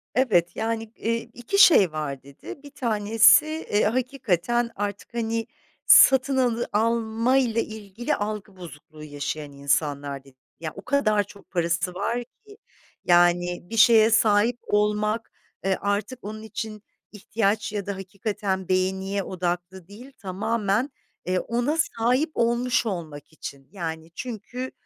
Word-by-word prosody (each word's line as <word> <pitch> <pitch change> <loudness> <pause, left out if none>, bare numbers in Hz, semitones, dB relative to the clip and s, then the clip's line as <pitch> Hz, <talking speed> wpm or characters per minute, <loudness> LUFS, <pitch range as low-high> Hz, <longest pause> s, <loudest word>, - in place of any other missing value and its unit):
Evet, 190 -10 +2
yani, 225 0 -2 0.2
ııı, 230 - +2 0.2
2 245 +12 -3
şey 205 - +7
var, 145 -4 -5
dedi. 140 - -11
1 285 - -11
tanesi, 225 +1 +4
eee, 310 -9 -1
hakikaten 240 - 0
artık, 205 +3 -5
hani, 230 -1 -2 0.4
satın 265 0 +6
alı 240 -2 +1
almayla 230 +2 +1
ilgili 220 +5 -4
algı 205 -1 -5
bozukluğu 155 -3 -12
yaşayan 145 0 -5
insanlar, 140 0 -1
dedi. 135 -1 -20 0.2
Ya, 160 -2 -5
o 195 - -8
kadar 215 -7 +1
çok 200 +1 -17
parası 175 0 0
var 230 +6 -2
ki. 415 - -19 0.5
Yani, 175 0 +3
bir 225 - -5
şeye 225 -1 +6
sahip 220 +2 +3
olmak, 210 +2 0 0.3
e, 190 -1 +1
artık 205 +5 -2
onun 215 +1 -7
için 215 -1 -6 0.3
ihtiyaç 210 0 -1
ya 205 -2 -3
da 200 -1 -4
hakikaten 195 0 -4
beğeniye 190 +1 0
odaklı 175 0 -4
değil, 240 +7 -13
tamamen, 210 +4 -1 0.4
eee, 185 0 0
ona 245 +7 -1
sahip 255 +1 +1
olmuş 240 +1 +1
olmak 160 -6 -6
için. 140 -3 -9
Yani, 165 -3 -6
çünkü 250 +2 -6
210 Hz, 130 wpm, -24 LUFS, 180-235 Hz, 0.5 s, şey